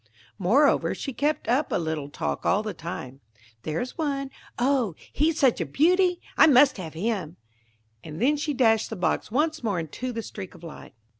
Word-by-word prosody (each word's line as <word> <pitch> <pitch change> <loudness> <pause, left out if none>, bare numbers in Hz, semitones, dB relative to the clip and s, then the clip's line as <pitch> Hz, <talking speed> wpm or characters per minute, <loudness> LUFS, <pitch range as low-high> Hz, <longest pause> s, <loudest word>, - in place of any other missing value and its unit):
Moreover, 250 +11 +3
she 270 - -5
kept 295 +6 -1
up 265 +5 +1
a - - +1
little 160 -4 -3
talk - - -3
all 205 +3 +2
the 215 - -4
time: 135 -5 -7 0.4
"There's 165 - -4
one:–oh, 275 - -1 0.2
he's 315 +2 +1
such 265 -5 +3
a - - 0
beauty!–I 360 +3 +3
must 275 -2 +6
have 160 -4 -7
him!" 185 -3 -3 0.7
and 155 0 -8
then 275 +7 +3
she 295 0 -2
dashed 225 -4 +3
the 225 - -5
box 180 - -1
once 310 +6 0
more 205 -7 -1
into 165 - -5
the 230 -1 -4
streak 190 -4 -8
of 175 - -16
light. 165 -7 -11
235 Hz, 170 wpm, -26 LUFS, 175-285 Hz, 0.7 s, must